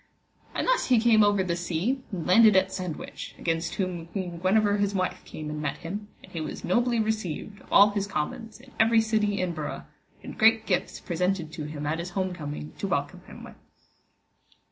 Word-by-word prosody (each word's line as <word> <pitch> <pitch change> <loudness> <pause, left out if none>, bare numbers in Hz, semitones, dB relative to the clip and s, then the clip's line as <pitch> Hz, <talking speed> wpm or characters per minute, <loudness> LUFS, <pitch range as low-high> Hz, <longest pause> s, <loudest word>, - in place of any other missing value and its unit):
And - - 0
thus - - +2
he 250 -3 +5
came 220 -2 +5
over 205 -2 +3
the 175 -2 -1
sea 175 +10 -1
and 175 -5 -4
landed 215 +3 +6
at 190 0 +3
Sandwich, 180 -4 -6
against 165 0 -2
whom 180 -4 -3
Queen 175 -2 -5
Guenever 205 +3 +3
his 200 0 0
wife 185 -1 -1
came 155 - -7
and 150 0 -4
met 150 -2 -2
him, 205 +5 -6 0.2
and - - -15
he 165 - -4
was 155 - -6
nobly 240 +4 +2
received 215 -2 -3
of - - -20
all 205 +1 +7
his 200 -1 -2
commons 210 +7 -4
in 260 +1 -17
every 225 0 +5
city 215 -2 +1
and 175 -2 -1
burgh, 155 -2 -5 0.4
and - - -9
great 225 0 +5
gifts 185 -4 -1
presented 180 -1 -1
to 155 - -5
him 150 -1 -6
at 155 +2 -1
his 170 +1 -4
home 185 -1 0
coming 145 - -6
to - - -2
welcome - - -2
him - - -11
with. - - -10
190 Hz, 200 wpm, -27 LUFS, 170-215 Hz, 0.4 s, all